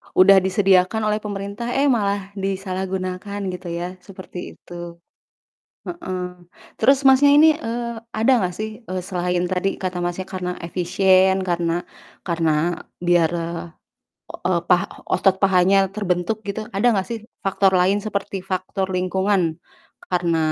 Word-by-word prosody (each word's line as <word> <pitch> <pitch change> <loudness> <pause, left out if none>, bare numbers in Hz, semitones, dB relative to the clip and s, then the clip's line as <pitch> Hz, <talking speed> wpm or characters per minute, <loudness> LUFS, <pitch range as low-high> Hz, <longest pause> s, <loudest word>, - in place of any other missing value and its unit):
Udah 190 +1 +7
disediakan 190 +2 +2
oleh 210 - 0
pemerintah, 205 +2 -5
eh 275 0 +3
malah 200 -3 0
disalahgunakan 190 0 -3
gitu 180 0 -8
ya, 175 +2 -5
seperti 185 -1 -11 0.2
itu. 175 - -15 1.1
Heeh, 185 - -5 0.6
terus 275 +1 +4
Masnya 270 +2 +6
ini, 315 +1 +7
eee, 235 -5 -4 0.2
ada 225 +4 +3 0.2
gak - - -7
sih, 215 +1 -5
eee, 185 -1 -3
selain 180 -2 -1
tadi 185 +2 -1
kata 185 -1 -3
Masnya 175 +2 -2
karena 180 -2 -4
efisien 185 +2 +3
karena 175 -1 -1 0.4
karena 165 -1 0 0.3
biar, 175 -2 +4
eee, 170 0 -4 0.8
o - - +2 0.2
pa 180 +3 +4 0.2
otot 195 -2 +3
pahanya 195 0 +4
terbentuk 185 0 -1
gitu, 200 +2 -3
ada 200 +5 0
gak 190 -1 0
sih 230 - -2 0.2
faktor 195 0 +2
lain 185 +3 +3
seperti 200 -1 -3
faktor 190 +1 -2
lingkungan 185 -2 0 0.5
karena 175 -2 0
190 Hz, 130 wpm, -22 LUFS, 180-200 Hz, 1.1 s, Udah